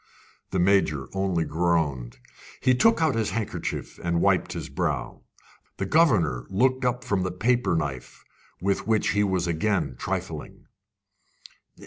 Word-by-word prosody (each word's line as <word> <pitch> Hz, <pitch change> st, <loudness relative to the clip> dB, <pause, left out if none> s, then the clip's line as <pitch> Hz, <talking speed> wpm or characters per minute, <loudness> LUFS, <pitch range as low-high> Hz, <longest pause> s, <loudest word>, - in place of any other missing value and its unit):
The 95 Hz, -, -2 dB
Major 85 Hz, -7 st, +2 dB
only 95 Hz, -4 st, 0 dB
groaned. 80 Hz, -7 st, 0 dB, 0.4 s
He 130 Hz, -, +3 dB
took 165 Hz, -, +4 dB
out 155 Hz, -, +3 dB
his 115 Hz, -3 st, 0 dB
handkerchief 110 Hz, -3 st, -4 dB
and 85 Hz, 0 st, 0 dB
wiped -, -, +2 dB
his -, -, -5 dB
brow. -, -, -3 dB, 0.6 s
The 95 Hz, -, -2 dB
governor 95 Hz, -, +2 dB
looked 130 Hz, +7 st, +1 dB
up 125 Hz, 0 st, 0 dB
from 100 Hz, -2 st, 0 dB
the 90 Hz, -, -1 dB
paper 115 Hz, +3 st, +1 dB
knife 70 Hz, -5 st, -4 dB, 0.4 s
with 100 Hz, +4 st, -1 dB
which 110 Hz, -2 st, +2 dB
he 105 Hz, 0 st, +2 dB
was 95 Hz, -3 st, 0 dB
again 90 Hz, -3 st, 0 dB
trifling. -, -, -5 dB
95 Hz, 135 wpm, -25 LUFS, 80-115 Hz, 0.6 s, took